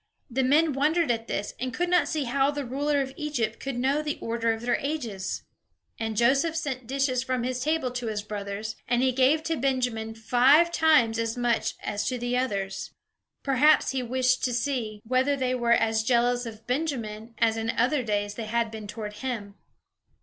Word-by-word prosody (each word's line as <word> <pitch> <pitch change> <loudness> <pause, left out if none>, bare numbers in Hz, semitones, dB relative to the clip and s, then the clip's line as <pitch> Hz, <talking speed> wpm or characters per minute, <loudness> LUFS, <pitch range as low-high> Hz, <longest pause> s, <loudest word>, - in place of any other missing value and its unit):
The 265 +3 +1
men 295 +4 +3
wondered 305 +2 +2
at 230 -1 -2
this, 205 - -3
and 255 0 -2
could 355 - 0
not 355 0 +3
see 310 -3 -1
how 270 +2 +2
the 290 -1 -3
ruler 285 +3 0
of 265 0 -4
Egypt 250 -8 -2
could 270 -2 -4
know 270 +4 +1
the 300 -1 -3
order 230 0 0
of 225 0 -3
their 240 0 +1
ages. 240 -10 -3 0.6
And 220 -1 -3
Joseph 275 +8 +3
sent 265 -7 -3
dishes 265 -1 0
from 255 -2 -2
his 250 0 -2
table 305 -2 0
to 245 -1 -4
his 210 -2 -3
brothers, 210 +1 -5
and 245 +1 +2
he 260 - +3
gave 265 +5 +3
to 325 0 -1
Benjamin 245 -4 -1
five 260 +9 +4
times 255 -10 +4
as 230 +1 -2
much 240 -1 0
as 205 0 -2
to 255 - -1
the 245 +1 -2
others. 200 -7 -2 0.5
Perhaps 280 +3 +4
he 265 -1 -1
wished 255 +1 +1
to 250 - -1
see 235 -5 -2
whether 260 +4 +2
they 255 -2 -1
were 240 -2 0
as 220 -1 +2
jealous 245 +1 +2
of 220 -1 -10
Benjamin 235 -6 -3
as 225 -1 +3
in 225 0 -2
other 255 +5 +2
days 205 -3 -1
they 225 +1 -5
had 230 +1 0
been 215 -2 -7
toward 210 0 -6
him. 225 -6 -4
245 Hz, 195 wpm, -27 LUFS, 225-275 Hz, 0.6 s, five